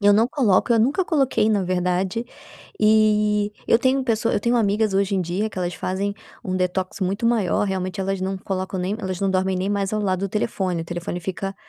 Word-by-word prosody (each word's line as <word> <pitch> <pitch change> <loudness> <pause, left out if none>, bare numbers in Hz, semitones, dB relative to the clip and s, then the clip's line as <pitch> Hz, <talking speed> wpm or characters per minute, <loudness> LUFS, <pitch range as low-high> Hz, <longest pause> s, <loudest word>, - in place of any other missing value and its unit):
Eu 205 0 +5
não 225 +3 +4
coloco, 240 -4 +2
eu 230 - +4
nunca 275 - +2
coloquei, 265 -9 +2
na 205 -3 +2
verdade, 180 +4 -1 0.6
e 210 -1 +3 0.2
eu 230 - +5
tenho 260 +2 +2
uma 260 - -4
pessoa 230 -2 0
eu - - +1
tenho 240 +3 +1
amigas 210 -1 +1
hoje 195 0 +1
em 190 - +1
dia 185 +6 -2
que 200 - -15
elas 180 -1 -1
fazem 195 +2 -2 0.3
um 185 -3 -2
detox 185 +1 -2
muito 195 +4 -1
maior, 220 -5 +2
realmente 190 0 -3
elas 195 0 -2
não 190 +1 -2
colocam 190 0 -4
nem 185 +3 -1
elas 185 -3 -3
não 195 -1 +1
dormem 190 0 +1
nem 190 +2 -1
mais 200 0 -1
ao 215 - 0
lado 185 -2 0
do 195 - -1
telefone, 190 -4 -1
o - - -8
telefone 175 +1 -5
fica 195 +2 -4
195 Hz, 220 wpm, -22 LUFS, 185-215 Hz, 0.6 s, Eu